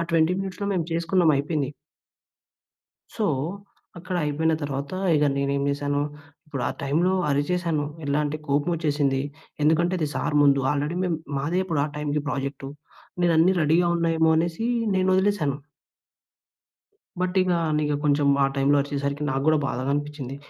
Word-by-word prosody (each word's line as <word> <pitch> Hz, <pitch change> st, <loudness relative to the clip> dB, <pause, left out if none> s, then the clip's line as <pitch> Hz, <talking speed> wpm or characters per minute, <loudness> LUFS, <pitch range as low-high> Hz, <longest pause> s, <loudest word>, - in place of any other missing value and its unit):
ఆ -, -, 0 dB
20 165 Hz, +2 st, +3 dB
మినిట్స్‌లో 195 Hz, +1 st, -4 dB
మేము 175 Hz, -4 st, -1 dB
చేసుకున్నాం 165 Hz, 0 st, +2 dB
అయిపేంది. 140 Hz, -1 st, -1 dB, 1.5 s
సో 220 Hz, -, 0 dB, 0.7 s
అక్కడ 180 Hz, +1 st, -4 dB
అయిపోయిన 160 Hz, +2 st, +1 dB
తర్వాత 140 Hz, +1 st, -4 dB, 0.2 s
ఇగ 150 Hz, 0 st, +3 dB
నేనేం 140 Hz, 0 st, 0 dB
చేశాను, 145 Hz, 0 st, -1 dB, 0.5 s
ఇప్పుడు 140 Hz, -5 st, -4 dB
ఆ -, -, -2 dB
టైంలో 160 Hz, +7 st, +1 dB, 0.2 s
అరిచేశాను. 155 Hz, +2 st, 0 dB, 0.2 s
ఎలా 140 Hz, +1 st, 0 dB
అంటే 145 Hz, +1 st, -2 dB
కోపమొచ్చేసింది. 145 Hz, -2 st, +1 dB, 0.4 s
ఎందుకంటే 170 Hz, +4 st, +3 dB
అది 155 Hz, -3 st, -1 dB
సార్ 135 Hz, -, -2 dB
ముందు 140 Hz, -1 st, +4 dB
ఆల్రెడీ 145 Hz, +4 st, -2 dB
మేము 175 Hz, -3 st, 0 dB, 0.2 s
మాదే 160 Hz, +6 st, -1 dB
ఇప్పుడు 165 Hz, -6 st, -1 dB
ఆ -, -, -1 dB
టైంకి 150 Hz, 0 st, -1 dB
ప్రాజెక్టు 135 Hz, -1 st, -4 dB, 0.5 s
నేను 175 Hz, -1 st, +4 dB
అన్ని 180 Hz, +4 st, +5 dB
రెడీ‌గా 165 Hz, +3 st, +3 dB
ఉన్నాయేమో 165 Hz, -1 st, +2 dB
అనేసి 170 Hz, +6 st, -1 dB, 0.3 s
నేను 185 Hz, 0 st, +2 dB
వదిలేసాను. 190 Hz, -8 st, +1 dB, 1.6 s
బట్ 185 Hz, +1 st, -1 dB
ఇగా 180 Hz, -1 st, +1 dB
అన్నిగ 150 Hz, -1 st, 0 dB
కొంచుం 145 Hz, -1 st, +3 dB, 0.2 s
ఆ -, -, +4 dB
టైంలో 140 Hz, +1 st, +3 dB
అరిచేసరికి 140 Hz, +1 st, -3 dB
నాకు 135 Hz, 0 st, -1 dB
గూడా 155 Hz, 0 st, +4 dB
బాధగా 130 Hz, 0 st, -2 dB
అనిపిచ్చింది. 145 Hz, -2 st, -4 dB
150 Hz, 145 wpm, -24 LUFS, 140-170 Hz, 1.6 s, అన్ని